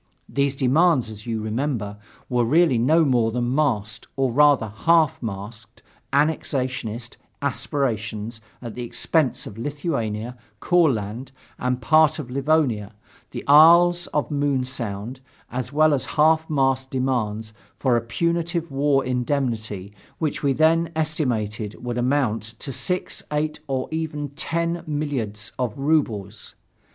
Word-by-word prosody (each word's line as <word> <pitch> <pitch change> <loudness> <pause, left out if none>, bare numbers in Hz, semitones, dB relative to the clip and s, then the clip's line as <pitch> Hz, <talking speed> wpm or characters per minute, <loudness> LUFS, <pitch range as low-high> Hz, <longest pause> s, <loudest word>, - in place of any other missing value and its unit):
These 140 0 0
demands, 135 -2 +3
as 105 +1 -11
you 110 -2 -2
remember, 110 -3 -2 0.3
were 125 -1 +1
really 145 0 +3
no 155 +7 +4
more 120 -5 +2
than 120 +2 -1
masked, 110 -8 -1
or, 135 -2 +1
rather, 145 -2 +4
half 160 +8 +2
masked 110 +1 -8 0.3
annexationist 130 -6 -1 0.2
aspirations 115 -5 -2 0.2
at 115 -2 -6
the 125 - -6
expense 130 +3 0
of 105 - -9
Lithuania, 125 -5 -3 0.2
Courland, 130 - +1 0.3
a 125 - 0
part 155 +5 +4
of 135 -6 -7
Livonia, 135 -7 +1 0.3
the - - -6
Isles 170 +4 +7
of 150 - -2
Moon 140 -2 +1
Sound, 120 -1 -5 0.3
as 125 +1 -4
well 155 +1 +4
as 135 - -1
a - - -8
half 160 +1 +4
masked 135 -3 +1
demand 115 -5 -1 0.3
for 130 -3 +2
a 120 - +2
punitive 170 +6 -1
war 135 0 +2
indemnity 120 -6 -2 0.2
which 155 -3 -2
we 140 - +2
then 160 +4 +3
estimated 115 -10 -2
would 120 0 -2
amount 125 -3 +1 0.2
to 135 - -6
six, 160 +9 -2
eight 150 +1 -1
or 130 -2 -2
even 155 -2 -3
ten 170 +4 -2
milliards 130 -9 -3
of 125 -4 -2
rubles. 115 -9 -1
130 Hz, 130 wpm, -23 LUFS, 115-150 Hz, 0.3 s, Isles